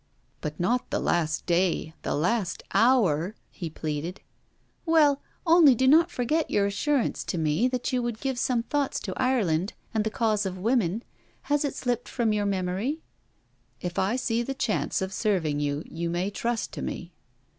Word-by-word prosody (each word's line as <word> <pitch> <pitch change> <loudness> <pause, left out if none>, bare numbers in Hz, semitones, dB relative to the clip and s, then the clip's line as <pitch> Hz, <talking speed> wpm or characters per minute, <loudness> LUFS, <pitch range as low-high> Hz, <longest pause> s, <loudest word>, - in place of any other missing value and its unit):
'But 150 0 -5
not 240 +8 0
the - - 0
last 160 -2 0
day 175 -2 +1
the - - -1
last 180 +5 0
hour!' 200 - +3 0.2
he 170 -4 -6
pleaded. 155 +3 -4 0.6
'Well! 305 -4 +4 0.2
only 325 -6 +7
do 260 +3 +2
not 325 +5 +6
forget 305 +3 0
your 200 - +2
assurance 245 +7 0
to 180 - -2
me 160 +8 +2
that 255 0 -2
you 250 - +2
would 235 -2 -3
give 265 -3 -2
some 245 -2 +1
thoughts 285 +2 -1
to - - -4
Ireland 205 -9 +1 0.2
and 220 -1 +1
the 220 - 0
cause 215 -2 +1
of 190 -2 -3
women. 220 0 +1 0.5
Has 290 +1 +3
it 285 - -2
slipped 245 -2 -2
from 230 -4 +1
your 205 -1 0
memory?' 195 - -1 0.8
'If 175 -1 -3
I 195 +5 +1
see 235 -2 0
the 270 +3 -3
chance 220 -6 0
of 190 0 -4
serving 180 -9 0
you, 145 +1 -1
you 170 +1 -4
may 175 +4 -1
trust 235 +2 -2
to - - -6
me.' 175 0 -5
215 Hz, 175 wpm, -27 LUFS, 175-255 Hz, 0.8 s, only